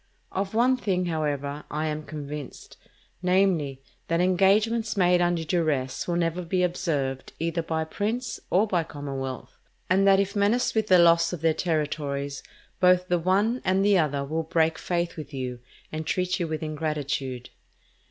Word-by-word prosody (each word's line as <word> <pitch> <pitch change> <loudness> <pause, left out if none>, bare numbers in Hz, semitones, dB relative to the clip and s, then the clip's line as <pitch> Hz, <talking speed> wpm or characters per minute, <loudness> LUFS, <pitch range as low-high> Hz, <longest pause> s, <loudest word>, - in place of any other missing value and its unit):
Of 195 +2 -3
one 255 +3 +4
thing, 185 -6 0
however, 150 -3 -2
I 155 +1 -2
am 155 0 -2
convinced, 145 -2 -7 0.5
namely, 180 -8 +1 0.2
that 165 0 +1
engagements 210 +5 +2
made 180 -1 +4
under 175 -1 +1
duress 155 -6 -1
will 175 - 0
never 170 +1 0
be 180 +1 0
observed 150 -7 -2
either 170 +1 -1
by 160 -1 -2
prince 220 +9 -3
or 195 +4 +3
by 180 -6 0
commonwealth; 135 -4 -6 0.3
and 195 +1 +4
that 195 0 +6
if 200 +1 -1
menaced 210 +5 +2
with 220 -1 +1
the 185 - +6
loss 170 0 +5
of 170 - -5
their 165 -1 +3
territories, 145 -4 -2 0.4
both 180 0 +4
the 175 0 +2
one 200 +8 +1
and 190 +1 +2
the 200 -2 +5
other 145 -3 0
will 160 +3 -1
break 160 0 +1
faith 175 -1 -2
with 150 -2 -7
you 125 -2 -4 0.3
and 155 0 -5
treat 180 +2 0
you 170 - -1
with 155 0 -4
ingratitude. 145 -5 -3
170 Hz, 160 wpm, -26 LUFS, 150-185 Hz, 0.5 s, that